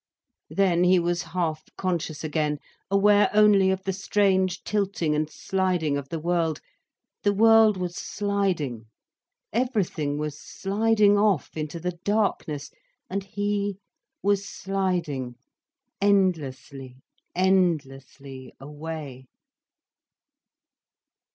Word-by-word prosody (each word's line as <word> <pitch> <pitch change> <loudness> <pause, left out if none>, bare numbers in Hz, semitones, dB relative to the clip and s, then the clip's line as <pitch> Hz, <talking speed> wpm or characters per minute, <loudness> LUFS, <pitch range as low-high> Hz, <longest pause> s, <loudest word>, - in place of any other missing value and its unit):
Then 180 -3 +2
he 180 +1 +5
was 175 0 0
half 165 -4 -3
conscious 170 -5 -2
again, 150 -1 -1 0.3
aware 205 +1 +4
only 210 -3 +6
of 190 0 -1
the 195 - -2
strange 190 -1 +1
tilting 195 -6 -1
and 150 0 0
sliding 180 -3 -1
of 140 -1 -5
the 165 - -3
world. 165 -1 0 0.6
The 205 - +2
world 225 -1 +6
was 180 -1 -4
sliding, 185 - -2 0.7
everything 200 - -1
was 150 -1 -4
sliding 205 +1 +2
off 205 -8 +1
into 155 +1 -4
the 175 0 -4
darkness. 195 -8 -1 0.4
And 195 +1 -2
he 205 0 -2 0.5
was 200 0 +2
sliding, 180 -11 -2 0.7
endlessly, 145 -10 0 0.4
endlessly 140 -8 -1
away. 145 -2 -8
180 Hz, 100 wpm, -25 LUFS, 150-200 Hz, 0.7 s, only